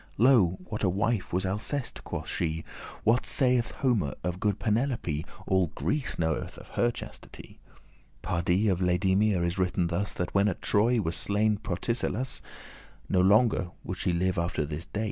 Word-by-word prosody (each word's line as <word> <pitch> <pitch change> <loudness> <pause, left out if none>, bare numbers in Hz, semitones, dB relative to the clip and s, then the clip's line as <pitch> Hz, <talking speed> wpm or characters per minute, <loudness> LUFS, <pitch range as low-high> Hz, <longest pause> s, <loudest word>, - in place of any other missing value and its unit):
Lo, 110 -7 +5
what 105 - -5
a 95 - +4
wife 100 +2 0
was 95 +2 0
Alceste?" 110 +8 -3
quoth - - -5
she. 80 0 -2 0.4
"What 115 +3 +3
saith 125 -3 +2
Homer 110 - 0
of 90 0 -2
good 105 -1 +1
Penelope? 110 - 0 0.2
All 95 -2 +2
Greece 150 -3 -1
knoweth 80 -2 -2
of - - -12
her 120 - +2
chastity. 120 - -10 0.6
Pardie, 90 +4 +1
of 95 -3 +2
Laedamia 95 +1 +2
is 85 +2 -1
written 90 -1 +1
thus, 85 +4 -1
That 90 - -3
when 100 +1 +4
at 95 - -1
Troy 115 +3 +3
was 85 -5 -1
slain 105 +1 +1
Protesilaus, 115 +6 -2 0.7
<24> - - -5
No 90 - +4
longer 100 -1 +4
would 90 - -5
she 95 -1 +1
live 90 +1 0
after 85 -3 -1
his 75 +4 -6
day. 105 - -4
95 Hz, 165 wpm, -28 LUFS, 90-110 Hz, 0.7 s, Lo